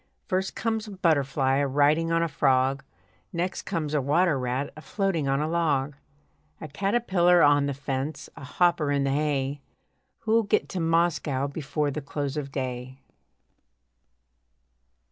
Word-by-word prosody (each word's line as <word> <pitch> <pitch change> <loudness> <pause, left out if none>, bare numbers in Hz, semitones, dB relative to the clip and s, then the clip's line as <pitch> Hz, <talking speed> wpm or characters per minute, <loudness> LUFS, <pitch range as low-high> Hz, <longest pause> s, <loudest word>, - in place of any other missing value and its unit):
First 190 +1 -2
comes 225 -1 -2
a - - -8
butterfly 140 -6 +2
a 140 0 +1
riding 150 +4 +2
on 165 0 +2
a - - +1
frog, 135 -2 +1 0.5
Next 175 +2 -3
comes 155 -5 -2
a 150 - +2
water 150 +2 +2
rat 125 +2 -2
a 155 - -10
floating 190 -6 -1
on 135 +1 +1
a 155 - 0
log; 150 -4 0 0.6
A 155 - -7
caterpillar 180 0 +2
on 145 -1 +4
the 140 - -2
fence, 140 +2 -4
a - - -11
hopper 165 +1 +1
in 140 -1 +1
the 135 - 0
hay 140 -1 -1 0.6
Who'll 230 0 +3
get 205 - 0
to 190 - -4
Moscow 165 -5 +1
before 145 0 -2
the 150 - -4
close 145 0 -4
of 140 -2 -4
day? 130 -1 -5
150 Hz, 150 wpm, -26 LUFS, 135-170 Hz, 0.6 s, on